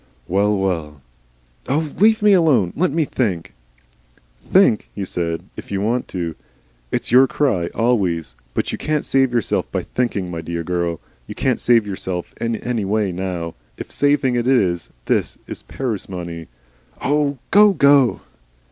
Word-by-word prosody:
"Well, 100 Hz, +3 st, +2 dB
well 80 Hz, -6 st, -2 dB, 0.4 s
" -, -, -33 dB
"Oh! 150 Hz, +2 st, 0 dB
leave 220 Hz, +1 st, +4 dB
me 210 Hz, -1 st, +6 dB
alone. 140 Hz, -, +3 dB
Let 180 Hz, +1 st, +1 dB
me 160 Hz, +1 st, +1 dB
think 95 Hz, -12 st, -2 dB, 0.4 s
" -, -, -36 dB
"Think," 185 Hz, -, +3 dB
he 100 Hz, -, -3 dB
said, 85 Hz, -2 st, -3 dB
"if -, -, -10 dB
you 100 Hz, -, -1 dB
want 115 Hz, +5 st, 0 dB
to. 85 Hz, -3 st, -4 dB, 0.6 s
It's -, -, -2 dB
your 130 Hz, +2 st, +7 dB
cry 110 Hz, -13 st, 0 dB
always. 100 Hz, -, 0 dB, 0.2 s
But -, -, -1 dB
you -, -, -5 dB
can't 150 Hz, -1 st, -1 dB
save 135 Hz, -2 st, +2 dB
yourself 120 Hz, -4 st, -1 dB
by -, -, -2 dB
thinking, 100 Hz, -8 st, -2 dB
my 85 Hz, -1 st, -4 dB
dear 85 Hz, 0 st, -4 dB
girl. 85 Hz, -1 st, -2 dB, 0.3 s
You -, -, -7 dB
can't -, -, 0 dB
save 115 Hz, -3 st, +3 dB
yourself 95 Hz, -3 st, -5 dB
in 115 Hz, 0 st, 0 dB
any 115 Hz, -1 st, -2 dB
way 100 Hz, 0 st, 0 dB
now. 90 Hz, -2 st, -4 dB, 0.2 s
If -, -, -8 dB
saving 145 Hz, -3 st, +2 dB
it 120 Hz, 0 st, 0 dB
is 95 Hz, -10 st, +2 dB, 0.2 s
this -, -, 0 dB, 0.3 s
parsimony 90 Hz, -9 st, -5 dB, 0.3 s
" 65 Hz, -, -31 dB
"Oh, 145 Hz, 0 st, +1 dB
go 205 Hz, +1 st, +7 dB
go." 140 Hz, -6 st, +4 dB
105 Hz, 160 wpm, -20 LUFS, 85-135 Hz, 0.6 s, your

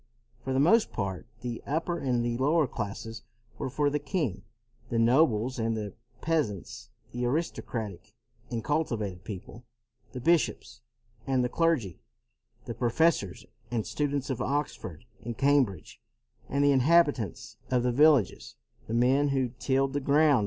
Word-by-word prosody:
For 130 Hz, -, -3 dB
the 130 Hz, -, +2 dB
most 210 Hz, +10 st, +4 dB
part 95 Hz, -4 st, -4 dB
the 120 Hz, -1 st, -4 dB
upper 165 Hz, +4 st, -1 dB
and 125 Hz, -3 st, 0 dB
the 120 Hz, 0 st, -1 dB
lower 150 Hz, +4 st, +3 dB
classes 115 Hz, -1 st, -5 dB, 0.4 s
were -, -, -2 dB
for 145 Hz, +3 st, +1 dB
the 150 Hz, -, 0 dB
king, 145 Hz, -, -2 dB, 0.5 s
the 115 Hz, -, -1 dB
nobles 120 Hz, 0 st, +3 dB
and 115 Hz, 0 st, 0 dB
the 105 Hz, -3 st, -5 dB, 0.3 s
peasants, 150 Hz, -, -2 dB, 0.2 s
the 120 Hz, +1 st, -3 dB
aristocratic 120 Hz, -, -3 dB, 0.3 s
and 115 Hz, -2 st, -3 dB
cultivated 110 Hz, -, -1 dB
people, 105 Hz, +3 st, -8 dB, 0.5 s
the 125 Hz, -, -6 dB
bishops 165 Hz, +5 st, +1 dB, 0.5 s
and 130 Hz, -2 st, +2 dB
the 125 Hz, -, 0 dB
clergy, 130 Hz, -, 0 dB, 0.7 s
the 115 Hz, -, -4 dB
professors 120 Hz, -, +1 dB, 0.2 s
and 115 Hz, -3 st, -1 dB
students 145 Hz, -2 st, -1 dB
of 130 Hz, -, -3 dB
Ox 145 Hz, +3 st, -1 dB
ford 80 Hz, -4 st, -9 dB, 0.2 s
and 115 Hz, -1 st, -5 dB
Cambridge, 135 Hz, -, +1 dB, 0.5 s
and 140 Hz, +1 st, +1 dB
the 145 Hz, -, +5 dB
inhabitants 140 Hz, -, +2 dB
of 125 Hz, -1 st, +2 dB
the 125 Hz, -, +2 dB
villages, 145 Hz, -4 st, +3 dB, 0.3 s
the 115 Hz, -, -2 dB
men 130 Hz, +4 st, +3 dB
who 135 Hz, -3 st, +1 dB
tilled 135 Hz, 0 st, +1 dB
the 145 Hz, -, 0 dB
ground. 145 Hz, 0 st, +4 dB
130 Hz, 145 wpm, -28 LUFS, 115-145 Hz, 0.7 s, the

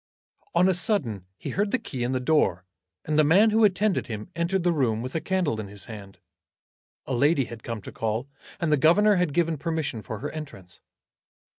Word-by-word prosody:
On 185 Hz, -, +5 dB
a 190 Hz, -, +3 dB
sudden 150 Hz, -, -1 dB
he -, -, -6 dB
heard 205 Hz, +1 st, 0 dB
the 260 Hz, -, +1 dB
key 135 Hz, -, -5 dB
in 120 Hz, -, -1 dB
the 130 Hz, -, 0 dB
door, 125 Hz, -, +1 dB, 0.4 s
and 155 Hz, 0 st, +1 dB
the -, -, +6 dB
man 195 Hz, +9 st, +5 dB
who 220 Hz, +1 st, +3 dB
attended 205 Hz, -1 st, +2 dB
him 105 Hz, -3 st, -6 dB
entered 170 Hz, +2 st, 0 dB
the 175 Hz, -, +3 dB
room 120 Hz, -8 st, 0 dB
with 130 Hz, -, -6 dB
a 160 Hz, -, -1 dB
candle 180 Hz, -, 0 dB
in 105 Hz, -, -5 dB
his 100 Hz, 0 st, -6 dB
hand. 100 Hz, -3 st, -10 dB, 0.9 s
A 135 Hz, -, -3 dB
lady 140 Hz, +2 st, +3 dB
had 115 Hz, -1 st, -9 dB
come 115 Hz, -3 st, -6 dB
to -, -, -8 dB
call, 115 Hz, +4 st, -2 dB, 0.3 s
and 170 Hz, -4 st, 0 dB
the 150 Hz, -, +4 dB
governor 195 Hz, +8 st, +5 dB
had 180 Hz, -4 st, +1 dB
given 165 Hz, -1 st, 0 dB
permission 155 Hz, -7 st, -2 dB
for 110 Hz, -, -6 dB
her 140 Hz, +7 st, -5 dB
entrance. 100 Hz, -, -9 dB
150 Hz, 205 wpm, -26 LUFS, 115-175 Hz, 0.9 s, the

